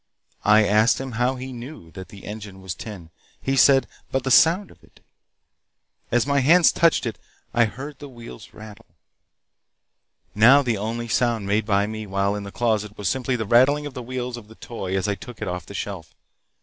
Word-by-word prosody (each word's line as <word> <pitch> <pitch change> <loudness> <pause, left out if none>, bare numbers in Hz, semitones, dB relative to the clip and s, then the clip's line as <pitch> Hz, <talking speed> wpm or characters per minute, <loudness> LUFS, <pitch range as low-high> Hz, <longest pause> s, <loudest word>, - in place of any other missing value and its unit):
I 105 0 +5
asked 110 +3 +3
him 135 -1 -5
how 120 +3 0
he 130 0 -7
knew 120 - -10
that 95 +1 -9
the 100 -2 -13
engine 105 -2 -8
was 95 -2 -5
tin. 95 -7 -10 0.3
He 135 - -1
said: 135 0 +5 0.3
'By - - +1
the 135 0 -2
sound 170 +8 +4
of - - -21
it.' - - -22 1.1
As 120 0 +2
my 140 0 +2
hands 165 +6 +5
touched 165 -5 +2
it 115 -3 -4 0.3
I 120 -1 +4
heard 135 +6 -8
the 145 - -9
wheels 120 -2 -12
rattle. 110 +1 -13 1.5
Now 125 +7 +6
the 120 -3 0
only 115 +3 -4
sound 115 -3 0
made 105 +2 0
by 100 -1 +2
me 110 0 -6
while 100 +1 0
in 105 - -4
the 100 0 -8
closet 105 -3 -1
was 100 -3 -1
simply 130 -1 -1
the 110 -2 -3
rattling 130 +7 +4
of 145 - -7
the 125 - -6
wheels 125 0 -5
of 110 -3 -12
the 110 - -15
toy 95 -6 -5
as 95 - -1
I 100 - +1
took 110 +4 -11
it 110 - -4
off 90 0 -5
the 100 - -9
shelf. 95 -3 -6
115 Hz, 200 wpm, -23 LUFS, 105-130 Hz, 1.5 s, Now